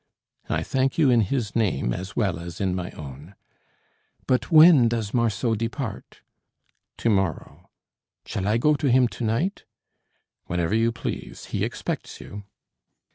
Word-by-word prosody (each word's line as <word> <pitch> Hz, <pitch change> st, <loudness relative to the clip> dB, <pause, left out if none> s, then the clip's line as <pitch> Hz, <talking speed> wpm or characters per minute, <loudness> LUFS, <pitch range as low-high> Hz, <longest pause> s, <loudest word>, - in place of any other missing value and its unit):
"I -, -, 0 dB
thank 135 Hz, 0 st, 0 dB
you 145 Hz, -6 st, +4 dB
in 120 Hz, -2 st, +5 dB
his 110 Hz, 0 st, -2 dB
name 100 Hz, -, +1 dB
as 95 Hz, +6 st, -6 dB
well 95 Hz, -8 st, 0 dB
as 85 Hz, 0 st, -8 dB
in 95 Hz, -2 st, 0 dB
my 90 Hz, -1 st, -3 dB
own." 75 Hz, +6 st, -10 dB, 0.9 s
"But 125 Hz, -, +1 dB
when 155 Hz, -6 st, +8 dB
does 115 Hz, -3 st, -2 dB
Marceau 115 Hz, -1 st, +1 dB
depart?" 115 Hz, 0 st, -5 dB, 0.8 s
"To 115 Hz, -, 0 dB
morrow." 95 Hz, -6 st, -2 dB, 0.6 s
"Shall 95 Hz, -, -3 dB
I 105 Hz, +2 st, +2 dB
go 150 Hz, +6 st, +3 dB
to 145 Hz, -1 st, 0 dB
him 125 Hz, 0 st, +5 dB
to 120 Hz, -, -7 dB
night?" 130 Hz, -, -1 dB, 0.8 s
"Whenever 90 Hz, +1 st, -1 dB
you 115 Hz, +1 st, +2 dB
please; 115 Hz, -, -6 dB
he -, -, 0 dB
expects -, -, -4 dB
you." 100 Hz, 0 st, -9 dB
115 Hz, 145 wpm, -24 LUFS, 95-125 Hz, 0.9 s, when